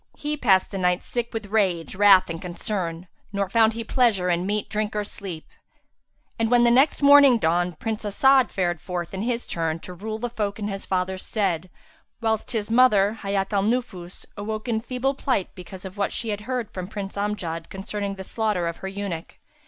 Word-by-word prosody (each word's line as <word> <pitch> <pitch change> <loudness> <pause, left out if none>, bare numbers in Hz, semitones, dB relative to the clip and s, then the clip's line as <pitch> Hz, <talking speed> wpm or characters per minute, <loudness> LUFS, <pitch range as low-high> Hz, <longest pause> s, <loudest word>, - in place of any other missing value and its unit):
He 300 0 -2
passed 195 -10 +3
the 195 - -4
night, 180 0 +1
sick 240 -1 -3
with 225 -2 -4
rage, 185 -6 +1
wrath 195 -1 +6
and 165 -1 -5
concern; 175 -1 -3 0.2
nor 200 -2 -1
found 225 +2 +4
he 230 +1 -4
pleasure 220 -7 +2
in 175 +2 0
meat, 210 +1 -1
drink 215 0 -2
or 210 - 0
sleep. 190 -5 -7 0.9
And 225 -1 +1
when 240 0 +5
the 240 - +5
next 275 +4 +3
morning 280 -3 +8
dawned 175 -2 0
Prince 220 +3 -3
As'ad 260 +5 +4
fared 175 -4 -1
forth 175 -1 -4
in 190 - -3
his 235 +1 -1
turn 165 -1 -1
to 180 - -8
rule 215 +5 -5
the 245 +2 -3
folk 210 -4 -3
in 210 -1 -3
his 195 -1 -6
father's 185 0 -1
stead, 185 -5 -1 0.5
whilst 220 -2 -1
his 220 -2 -2
mother, 225 -3 +4
Hayat 195 0 -1
al 200 - +3
Nufus, 200 -5 -2
awoke 215 +2 -4
in 220 -2 0
feeble 255 +3 -1
plight 260 -8 -1
because 185 +1 -10
of 190 +2 -8
what 200 - +1
she 230 - -2
had 205 -1 -2
heard 250 -4 -2
from 185 -1 -5
Prince 200 -1 -6
Amjad 190 -5 -3
concerning 200 +1 -4
the 190 - -7
slaughter 210 -4 -1
of 170 - -4
her 190 - -6
eunuch. 195 -4 -5
205 Hz, 200 wpm, -24 LUFS, 185-225 Hz, 0.9 s, morning